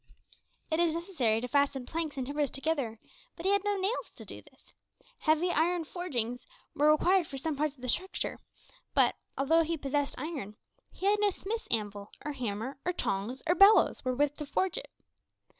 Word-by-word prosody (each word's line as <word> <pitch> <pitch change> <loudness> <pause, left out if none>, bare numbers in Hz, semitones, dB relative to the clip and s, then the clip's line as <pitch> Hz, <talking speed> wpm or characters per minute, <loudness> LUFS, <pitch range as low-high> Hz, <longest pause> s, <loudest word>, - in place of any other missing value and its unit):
It 315 - +1
is 335 -2 +2
necessary 290 - 0
to 250 - -3
fasten 280 -1 +1
planks 320 0 -3
and 260 - -2
timbers 285 +1 -1
together, 275 -5 -2 0.4
but 335 - -9
he 390 - +4
had 400 -1 +2
no 410 -1 0
nails 400 +6 -1
to - - -11
do - - -9
this. - - -23 0.5
Heavy 320 +3 +2
iron 340 +1 +1
forgings 250 -9 -3 0.3
were 295 +1 +4
required 350 +3 +3
for 275 - -7
some 305 +3 -2
parts 300 0 -1
of 255 - -18
the - - -3
structure, 375 +9 -1 0.6
but, - - +5 0.2
although 320 +5 +4
he 330 0 -1
possessed 285 0 -1
iron, 280 -11 -5 0.4
he 380 - -7
had 415 +1 +4
no 415 0 +4
smith's 430 +4 -4
anvil, 205 -2 -1 0.2
or 300 - -2
hammer, 250 0 -4
or 360 - 0
tongs, 225 - -2
or 340 - +4
bellows, 395 +4 +6
wherewith 275 +3 +1
to 300 - -5
forge 370 +5 0
it. - - -11
300 Hz, 185 wpm, -30 LUFS, 260-355 Hz, 0.6 s, bellows